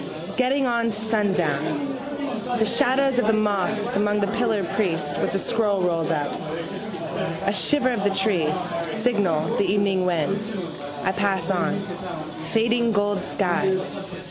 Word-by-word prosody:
Getting 265 Hz, +2 st, +2 dB
on 235 Hz, -2 st, +1 dB
to 210 Hz, -, -5 dB
sundown. 195 Hz, -9 st, +1 dB, 0.8 s
The 220 Hz, -, +3 dB
shadows 260 Hz, +3 st, +3 dB
of 215 Hz, -, +1 dB
the 220 Hz, -, +4 dB
mosques 210 Hz, +2 st, 0 dB
among 205 Hz, +1 st, +2 dB
the 200 Hz, -, +2 dB
pillars: 225 Hz, -5 st, +1 dB
priest 165 Hz, -8 st, 0 dB
with -, -, 0 dB
a -, -, +4 dB
scroll 205 Hz, -1 st, +1 dB
rolled 165 Hz, -2 st, +1 dB
up. 145 Hz, -3 st, 0 dB, 1.1 s
A 200 Hz, -, +2 dB
shiver 255 Hz, +6 st, +3 dB
of 230 Hz, -5 st, -1 dB
the 200 Hz, -, +3 dB
trees, 190 Hz, -5 st, +1 dB, 0.3 s
signal, 205 Hz, -6 st, +1 dB
the -, -, +2 dB
evening 195 Hz, -2 st, +2 dB
wind. 195 Hz, +6 st, 0 dB, 0.5 s
I 190 Hz, -, +2 dB
pass 195 Hz, 0 st, 0 dB
on. 185 Hz, +1 st, 0 dB, 0.7 s
Fading 235 Hz, +1 st, +2 dB
gold 205 Hz, -1 st, +1 dB
sky. 190 Hz, 0 st, +1 dB
205 Hz, 140 wpm, -24 LUFS, 185-225 Hz, 1.1 s, the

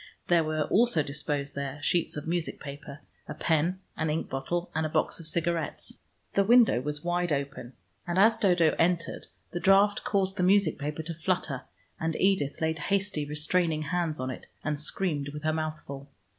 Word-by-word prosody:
There 170 Hz, -2 st, +5 dB
were 155 Hz, 0 st, 0 dB
also 215 Hz, -3 st, +3 dB
disposed 140 Hz, 0 st, -2 dB
there 140 Hz, 0 st, -4 dB
sheets 170 Hz, -1 st, +1 dB
of 150 Hz, -, -5 dB
music 170 Hz, 0 st, -2 dB
paper, 140 Hz, 0 st, -9 dB, 0.3 s
a -, -, -6 dB
pen 170 Hz, +4 st, +1 dB
and 160 Hz, -1 st, -1 dB
ink 155 Hz, +2 st, -2 dB
bottle, 170 Hz, +7 st, -2 dB
and 160 Hz, -, 0 dB
a 155 Hz, -, -1 dB
box -, -, 0 dB
of 165 Hz, -, -2 dB
cigarettes. 165 Hz, -1 st, -1 dB, 0.3 s
The 200 Hz, -, +4 dB
window 230 Hz, -, +5 dB
was 150 Hz, +2 st, -4 dB
wide 175 Hz, 0 st, 0 dB
open, 140 Hz, -3 st, -3 dB, 0.3 s
and 175 Hz, +1 st, -1 dB
as 220 Hz, +3 st, +5 dB
Dodo 175 Hz, -7 st, +3 dB
entered 170 Hz, -1 st, 0 dB, 0.2 s
the 175 Hz, -, -3 dB
draught 195 Hz, +2 st, +4 dB
caused 195 Hz, -1 st, 0 dB
the -, -, 0 dB
music 185 Hz, -3 st, +3 dB
paper 150 Hz, +2 st, -3 dB
to 165 Hz, +2 st, -4 dB
flutter, 165 Hz, -5 st, -2 dB, 0.3 s
and 160 Hz, 0 st, -1 dB
Edith 185 Hz, -8 st, +1 dB
laid 160 Hz, 0 st, 0 dB
hasty 195 Hz, -3 st, 0 dB
restraining 155 Hz, +2 st, 0 dB
hands 165 Hz, 0 st, -1 dB
on 130 Hz, 0 st, -2 dB
it, 125 Hz, -, -9 dB, 0.2 s
and 150 Hz, -1 st, -1 dB
screamed 150 Hz, -2 st, -1 dB
with 150 Hz, -, -7 dB
her 155 Hz, 0 st, +1 dB
mouth 155 Hz, -1 st, -3 dB
full. 140 Hz, 0 st, -8 dB
160 Hz, 185 wpm, -28 LUFS, 150-180 Hz, 0.3 s, There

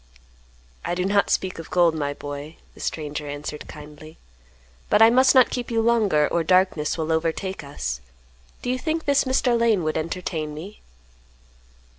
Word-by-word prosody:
"I 175 Hz, -, -2 dB
do 180 Hz, +1 st, -1 dB
not 200 Hz, +1 st, +2 dB
speak 185 Hz, -2 st, -1 dB
of 165 Hz, -, -9 dB
gold, 175 Hz, -2 st, +3 dB
my 145 Hz, -2 st, -3 dB
boy," 145 Hz, +2 st, -7 dB, 0.2 s
the -, -, -17 dB
stranger 150 Hz, -1 st, -4 dB
answered 145 Hz, +1 st, -6 dB
kindly. 150 Hz, +1 st, -12 dB, 0.7 s
"But -, -, +4 dB
I 225 Hz, +1 st, +8 dB
must 260 Hz, +3 st, +5 dB
not 255 Hz, -2 st, +6 dB
keep 245 Hz, -1 st, -3 dB
you 230 Hz, -1 st, 0 dB
longer, 210 Hz, -10 st, +3 dB
or 170 Hz, -, 0 dB
darkness 185 Hz, -3 st, +2 dB
will 160 Hz, 0 st, -2 dB
overtake 165 Hz, +3 st, -2 dB
us. 65 Hz, -, -5 dB, 0.6 s
Do 245 Hz, -, -1 dB
you 255 Hz, -, -1 dB
think 320 Hz, +3 st, -2 dB
this 285 Hz, -1 st, +3 dB
Mr. 260 Hz, -2 st, +2 dB
Lane 230 Hz, -6 st, +2 dB
would 155 Hz, 0 st, -1 dB
entertain 155 Hz, -2 st, -4 dB
me?" 190 Hz, +8 st, -9 dB
170 Hz, 165 wpm, -23 LUFS, 150-225 Hz, 0.7 s, I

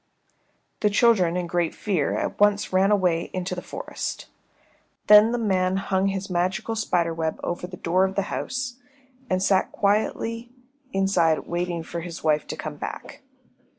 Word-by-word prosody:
The 210 Hz, -, +3 dB
children 200 Hz, -5 st, +3 dB
in 180 Hz, -, -1 dB
great 175 Hz, -1 st, -1 dB
fear 185 Hz, -9 st, -1 dB
at -, -, -3 dB
once 205 Hz, -1 st, +3 dB
ran 190 Hz, +1 st, +4 dB
away 180 Hz, -5 st, +1 dB
into 185 Hz, 0 st, -2 dB
the 180 Hz, -, -4 dB
forest. -, -, -6 dB, 0.8 s
Then 210 Hz, +2 st, +8 dB
the 240 Hz, -, 0 dB
man 190 Hz, -4 st, +1 dB
hung 195 Hz, 0 st, 0 dB
his 195 Hz, 0 st, -2 dB
magical 185 Hz, +5 st, -1 dB
spider 175 Hz, -6 st, 0 dB
web 160 Hz, -1 st, -2 dB
over 175 Hz, +1 st, -3 dB
the 180 Hz, 0 st, -10 dB
door 185 Hz, +3 st, +2 dB
of 190 Hz, 0 st, -4 dB
the 200 Hz, -, +1 dB
house, 255 Hz, -1 st, -3 dB, 0.5 s
and 185 Hz, 0 st, +1 dB
sat 190 Hz, -1 st, +2 dB
quietly 225 Hz, +3 st, -1 dB, 0.4 s
inside 185 Hz, -5 st, +2 dB
waiting 175 Hz, -1 st, -2 dB
for 170 Hz, +1 st, -5 dB
his 170 Hz, 0 st, -8 dB
wife 155 Hz, -1 st, +1 dB
to -, -, -5 dB
come -, -, -6 dB
back. -, -, -7 dB
185 Hz, 160 wpm, -24 LUFS, 175-205 Hz, 0.8 s, Then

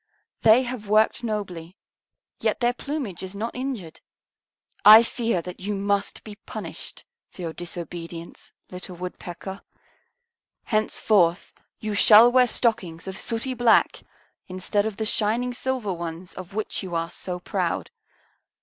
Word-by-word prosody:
They 230 Hz, +3 st, +6 dB
have 240 Hz, -4 st, -6 dB
worked 215 Hz, +3 st, +3 dB
nobly, 185 Hz, -6 st, -4 dB, 0.6 s
yet -, -, 0 dB
their 240 Hz, 0 st, +2 dB
plumage 255 Hz, -, -5 dB
is 190 Hz, +1 st, -7 dB
not 225 Hz, +3 st, -3 dB
injured. 250 Hz, -11 st, -5 dB, 0.8 s
I 220 Hz, +2 st, +10 dB
fear 230 Hz, -7 st, -1 dB
that 180 Hz, -, -8 dB
you 205 Hz, +2 st, -3 dB
must 200 Hz, 0 st, -1 dB
be 210 Hz, -2 st, -10 dB
punished -, -, -8 dB, 0.2 s
for 180 Hz, -, -10 dB
your 165 Hz, -1 st, -4 dB
disobedience, 170 Hz, -1 st, -8 dB, 0.2 s
little 180 Hz, 0 st, -7 dB
Woodpecker. 180 Hz, +2 st, -7 dB, 1.0 s
Henceforth 210 Hz, -5 st, +1 dB, 0.3 s
you 215 Hz, -1 st, -3 dB
shall 215 Hz, +3 st, +8 dB
wear 250 Hz, 0 st, +5 dB
stockings 210 Hz, -10 st, +1 dB
of 190 Hz, -, -5 dB
sooty 230 Hz, +5 st, -3 dB
black 240 Hz, -2 st, +3 dB, 0.5 s
instead 190 Hz, +3 st, -1 dB
of 210 Hz, -2 st, -6 dB
the 220 Hz, -, -2 dB
shining 230 Hz, +4 st, 0 dB
silver 245 Hz, -5 st, -2 dB
ones 170 Hz, +1 st, -6 dB
of 185 Hz, +1 st, -10 dB
which 215 Hz, -, -2 dB
you 180 Hz, -3 st, -5 dB
are 165 Hz, +1 st, -2 dB
so 180 Hz, 0 st, -5 dB
proud. 180 Hz, -, -2 dB
205 Hz, 135 wpm, -24 LUFS, 180-230 Hz, 1.0 s, I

